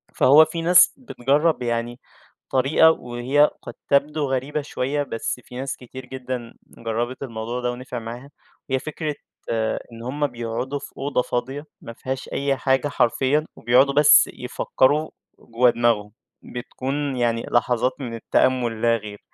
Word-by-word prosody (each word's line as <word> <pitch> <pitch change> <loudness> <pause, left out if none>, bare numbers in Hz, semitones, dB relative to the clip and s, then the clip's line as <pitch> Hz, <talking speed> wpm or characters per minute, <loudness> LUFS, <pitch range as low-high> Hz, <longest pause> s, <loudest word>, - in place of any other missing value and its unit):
فهو 150 +4 +7
في 165 +1 -5
ناس 175 +1 +6
بتجرب 150 - 0
يعني 120 +1 -2 0.5
طريقة 135 +5 +5
وهي 130 +2 +1
قد - - -8 0.2
تبدو 145 +2 +2
غريبة 140 +3 -1
شوية، 145 +1 -2
بس 125 -1 -4
في 125 - -13
ناس 135 +2 -3
كتير 130 +1 -10
جدًا 130 -2 -6 0.2
جربت 120 +3 -3
الموضوع 115 0 -4
ده 125 0 0
ونِفع 125 0 -6
معاها، 120 +4 -8 0.4
وهي 130 - +1
فكرة 155 +1 -4 0.8
إن 115 0 -10
هُم 145 +4 -1
بيقعدوا 120 +3 -4
في 140 - -11
أوضة 135 -2 0
فاضية 135 +5 -3 0.2
ما 115 - -9
فيهاش 130 +3 -5
أي 140 0 0
حاجة 135 +2 +1
حرفيًا، 140 +3 +1
وبيقعدوا 130 +4 +3
بس 150 +1 +6
يفكروا 150 +4 0 0.3
جوّا 120 +2 +2
دماغهم. 115 -3 +1 0.3
بتكُون 135 +3 -4
يعني 115 -1 0
لحظات 120 +1 +2
من 120 -4 -5
التأمل 120 0 +1
لا 115 0 +3
غير، 105 -1 -9
130 Hz, 145 wpm, -23 LUFS, 120-140 Hz, 0.8 s, فهو